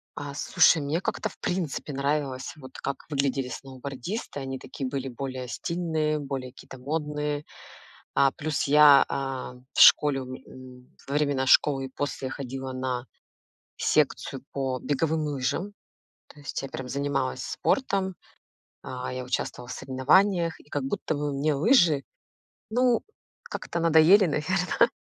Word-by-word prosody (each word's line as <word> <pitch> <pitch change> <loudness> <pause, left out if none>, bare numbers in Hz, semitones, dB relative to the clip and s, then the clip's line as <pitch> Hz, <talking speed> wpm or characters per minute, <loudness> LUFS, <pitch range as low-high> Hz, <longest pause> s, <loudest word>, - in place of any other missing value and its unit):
А, 145 -1 -6
слушай 155 +2 +4
мне 145 +5 -1
как-то - - -2
в - - -17
принципе 170 -4 -3
нравилось 140 -1 -1
вот, 130 -2 -11
как 140 -1 -4
выглядели 135 -2 0
сноубордисты, 135 - -6
они 135 -1 -5
такие 135 +1 -5
были 135 0 -3
более 130 0 -5
стильные, 160 +1 -1
более 135 -3 -5
какие-то 130 0 -12
модные. 150 +1 -3 0.7
А, 135 -1 +4
плюс 150 0 -2
я, 145 -1 +8
а, 135 -2 -3 0.2
в - - +1
школе, 145 -2 +7
у - - -8
у, 130 -1 -13 0.2
во - - -5
времена 140 -3 +1
школы 135 0 +4
и - - -8
после 130 -1 -4
ходила 130 -1 -5
на 130 -1 -3 0.7
секцию 135 - 0
по 135 -2 -2
беговым 155 +3 0
лыжам, 145 +7 -2 0.6
то 150 - -16
есть 140 - -4
я 135 - -5
прям 130 - -6
занималась 140 -1 -1
спортом, 190 +2 0 0.7
а, 125 0 -5
я 130 0 -4
участвовала 125 -1 -3
в - - -7
соревнованиях, 165 +7 +2
и - - -20
как 145 -2 -2
будто 135 +3 -2
бы 145 0 -2
мне 145 +3 +1
лыжи, 160 - +4 0.7
ну, 245 +1 +3 0.4
как-то 170 - -5
надоели, 165 +4 +6
наверно. 180 +4 +1
140 Hz, 140 wpm, -27 LUFS, 130-155 Hz, 0.7 s, я